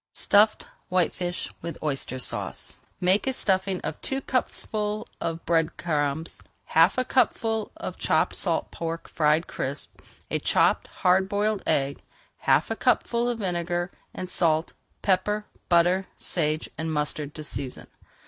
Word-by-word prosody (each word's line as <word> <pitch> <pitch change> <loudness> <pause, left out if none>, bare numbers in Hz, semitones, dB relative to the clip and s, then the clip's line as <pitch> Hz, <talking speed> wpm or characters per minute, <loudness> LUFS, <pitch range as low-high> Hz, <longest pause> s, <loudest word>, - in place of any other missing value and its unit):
STUFFED 210 +2 +4 0.2
WHITEFISH 180 0 0
WITH 170 - -5
OYSTER 135 -3 -1
SAUCE 130 - -3 0.2
Make 185 +6 +3
a 265 - +2
stuffing 190 -4 +1
of - - -5
two 270 - -1
cupfuls 215 -5 -2
of 165 0 -3
bread 165 -1 +2
crumbs, 150 -1 -1 0.2
half 165 +7 +4
a 255 - +2
cupful 225 -4 +1
of - - -6
chopped - - +2
salt - - 0
pork 165 0 -4
fried 155 +1 +2
crisp, 140 +2 -5 0.3
a - - +1
chopped - - +3
hard 190 +1 +2
boiled 205 0 +1
egg, 140 0 +1 0.4
half - - +3
a - - 0
cupful 235 0 +2
of 240 - -1
vinegar, 175 -2 -1 0.2
and 185 - -5
salt, 165 -3 +2 0.3
pepper, 210 +2 +1 0.2
butter, 180 +2 +4
sage, 155 -2 0
and 160 0 -1
mustard 150 -1 -2
to 155 - -6
season. 140 -3 -5
175 Hz, 140 wpm, -26 LUFS, 160-205 Hz, 0.4 s, STUFFED